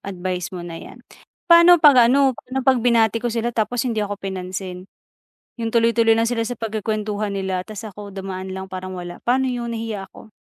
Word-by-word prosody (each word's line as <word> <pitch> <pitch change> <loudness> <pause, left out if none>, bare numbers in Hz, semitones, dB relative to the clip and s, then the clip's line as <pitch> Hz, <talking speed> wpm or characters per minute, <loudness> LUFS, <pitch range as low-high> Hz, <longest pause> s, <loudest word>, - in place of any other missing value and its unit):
advice 185 -2 -4
mo 175 -1 -6
na 170 -1 -7
'yan. - - -12 0.5
Pa'no 340 0 +8
'pag 265 -7 +7
ano, 275 0 +4
pa'no 255 +3 -6
'pag 260 -1 +4
binati 230 -2 +3
ko 240 - -1
sila 235 +1 -2
tapos 230 +3 -1
hindi 230 -3 -1
ako 205 0 -3
pinansin, 185 -1 -6 0.7
yung 230 - -1
tuloy-tuloy 230 -1 +4
lang 230 0 +2
sila 230 -2 -1
sa 245 - -4
pagkukwentuhan 215 -2 -3
nila 190 -1 -2
tas 215 0 -8
ako 205 -1 -9
dumaan 190 -1 -6
lang, 190 0 -6
parang 185 0 -6
wala. 175 0 -7
Pa'no 260 +2 +2
yun, 240 -1 -4
nahihiya 220 -4 -5
ako. 220 - -15
220 Hz, 190 wpm, -21 LUFS, 190-235 Hz, 0.7 s, Pa'no